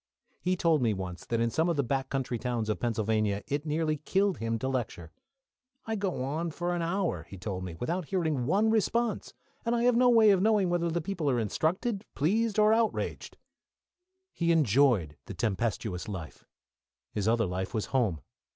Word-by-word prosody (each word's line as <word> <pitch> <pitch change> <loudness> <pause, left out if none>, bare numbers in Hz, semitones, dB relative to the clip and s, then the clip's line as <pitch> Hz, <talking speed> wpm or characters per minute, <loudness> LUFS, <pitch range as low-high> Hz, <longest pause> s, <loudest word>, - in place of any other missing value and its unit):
He 185 +1 +1
told 165 -4 +3
me 110 -4 +2
once 90 -2 -6
that 115 - 0
in 115 0 +1
some 160 +6 +1
of 170 - +1
the 140 - +1
back 135 +1 -1
country 130 -3 -2
towns 120 -3 -2
of 105 -5 -1
Pennsylvania 110 -2 0
it 145 +2 -3
nearly 155 0 0
killed 195 +5 0
him 115 0 -1
to 130 - -3
lecture. 110 -11 -3 0.7
"I 225 - -2
go 190 -9 -2
on 155 +6 -2
for 175 +2 -2
an 175 - -1
hour," 165 - -1
he 100 - -9
told 95 0 -4
me, 90 -3 -6
"without 170 - -2
hearing 155 -8 -1
one 205 +7 +3
response, 230 +1 0 0.3
and 235 +1 +1
I 235 - +1
have 245 -1 +4
no 250 +1 +5
way 225 -3 +6
of 190 -2 +3
knowing 205 -4 +3
whether 170 -1 +1
the 170 +1 -1
people 165 -3 -2
are 125 -3 +1
instructed, 185 - -1
pleased, 210 +9 +1
or 215 0 +5
outraged." 225 -1 -1 1.0
He 170 -1 +1
enjoyed 125 - +3
the - - -7
tempestuous 110 -3 -2
life. 95 -7 -7 0.7
His 105 -1 -2
other 115 0 +3
life 95 +1 -3
was 110 -3 -2
home. 110 - +1
145 Hz, 190 wpm, -29 LUFS, -, 1.0 s, way